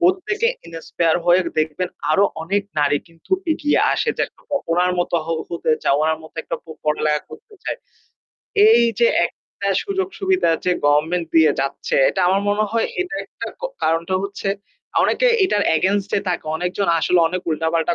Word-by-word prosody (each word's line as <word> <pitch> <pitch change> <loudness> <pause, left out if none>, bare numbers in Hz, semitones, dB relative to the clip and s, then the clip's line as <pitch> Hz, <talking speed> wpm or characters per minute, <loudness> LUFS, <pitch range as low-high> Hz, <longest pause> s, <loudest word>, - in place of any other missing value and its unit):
প্রত্যেকে 375 +5 +2 0.2
ইন্সপায়ার 165 0 -1
হয়ে 175 +1 +5 0.2
দেখবেন 155 +3 -1 0.2
আরো 200 - +4 0.2
অনেক 200 +5 0 0.2
নারী 145 0 +3
কিন্তু 165 -1 -25 0.2
এগিয়ে 295 -2 +1
আসে - - -1
যে - - 0
একরকম 285 - -5
ওনার 180 +1 +2
মত 175 - -1
হ - - -15 0.2
হতে 170 -2 -2
চাওয়া 145 +2 +3
উনার 160 0 +1
মত 160 - -13
একটা - - -4
প-পড়ালেখা 150 -1 -1
করতে 440 0 -13
চায়। - - -4 0.9
এইযে 235 - +4 0.2
একটা 200 - -7
সুযোগ-সুবিধা 385 - 0
যে 180 - +3
গভর্নমেন্ট 160 +4 +2
দিয়ে 160 -2 +6
যাচ্ছে। 135 - -3
এটা 190 - -1
আমার 190 +2 +2
মনে 205 +1 +2
হয় 230 0 +1
এটা 360 -4 -3
একটা - - -8
ক - - -23 0.2
কারণটা 165 +3 +1
হচ্ছে 200 0 -4 0.5
অনেকে - - +2 0.2
এটার 210 - +1
এগেইনস্ট 200 +4 0
এ - - -3
থাকে। 175 - -2
অনেকজন 180 +4 -2
আসলে 180 +2 +2
অনেক 180 +2 -3
উল্টা-পাল্টা 160 +2 0
180 Hz, 160 wpm, -20 LUFS, 160-230 Hz, 0.9 s, দিয়ে